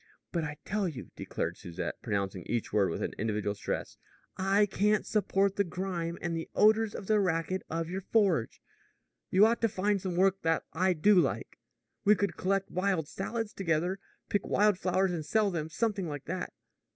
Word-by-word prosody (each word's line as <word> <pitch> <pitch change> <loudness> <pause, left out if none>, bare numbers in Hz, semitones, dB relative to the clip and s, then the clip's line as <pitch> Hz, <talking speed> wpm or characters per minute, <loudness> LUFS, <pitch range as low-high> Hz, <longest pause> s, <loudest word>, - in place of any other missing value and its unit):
"But 170 -2 -1
I 150 -1 -4
tell 205 -1 0
you," 145 -7 -7
declared - - -3
Susette, 85 +1 -5
pronouncing 100 -4 -2
each 120 -4 -2
word 100 -3 +3
with 80 - -3
an - - -3
individual 105 -1 -1
stress, 100 - -4 0.4
"I 195 +2 +3
can't 205 +1 +1
support 200 -2 +1
the 200 - +4
grime 175 -2 -3
and 170 -1 -1
the 165 - -4
odors 215 0 +4
and 200 - -6
the 215 +1 +3
racket 185 0 0
of 165 0 -2
your 185 +3 -4
forge. 195 - +1 0.7
You 195 +3 +6
ought 230 +1 +2
to 230 - +3
find 200 0 0
some 185 -2 -3
work 190 +1 +3
that 165 0 +1
I 185 +3 +2
do 190 +6 +4
like. 180 - +1 0.4
We 210 0 +6
could 200 +1 -1
collect 195 +1 0
wild 185 -4 0
salads 225 +4 -4
together 175 +1 0 0.3
pick 205 - -1
wild 205 -2 +3
flowers 185 0 +1
and 165 -3 -3
sell 210 +5 +2
them 160 -3 -3
something 205 0 -1
like 145 -2 -6
that." 185 0 -4
185 Hz, 185 wpm, -30 LUFS, 165-200 Hz, 0.7 s, You